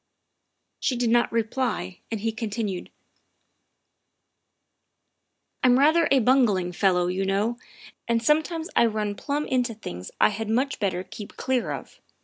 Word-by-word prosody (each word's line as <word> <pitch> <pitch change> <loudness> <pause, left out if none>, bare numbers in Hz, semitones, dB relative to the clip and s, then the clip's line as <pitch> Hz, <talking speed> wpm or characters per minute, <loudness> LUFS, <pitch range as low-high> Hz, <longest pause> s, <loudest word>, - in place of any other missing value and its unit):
' - - -53
' - - -52
She 260 - 0
did 240 -1 +1
not 240 0 +3
reply, 225 - -2
and 225 -3 -3
he 225 +1 0
continued: 220 -4 -4 2.7
"I'm 250 -1 +6
rather 310 +4 +4
a 275 - +5
bungling 225 -8 +3
fellow, 180 -1 +2
you 185 +2 -1
know, 205 +5 0 0.5
and 230 -1 +1
some 300 +5 +4
times 325 0 -5
I 235 - +5
run 210 -2 -2
plump 290 +7 -3
into 250 -3 0
things 90 - -7
I - - +6
had 215 +1 -4
much 260 +5 0
better 185 -4 -1
keep 210 +2 -10
clear 260 -2 0
of. - - -8
225 Hz, 150 wpm, -25 LUFS, 200-255 Hz, 2.7 s, I'm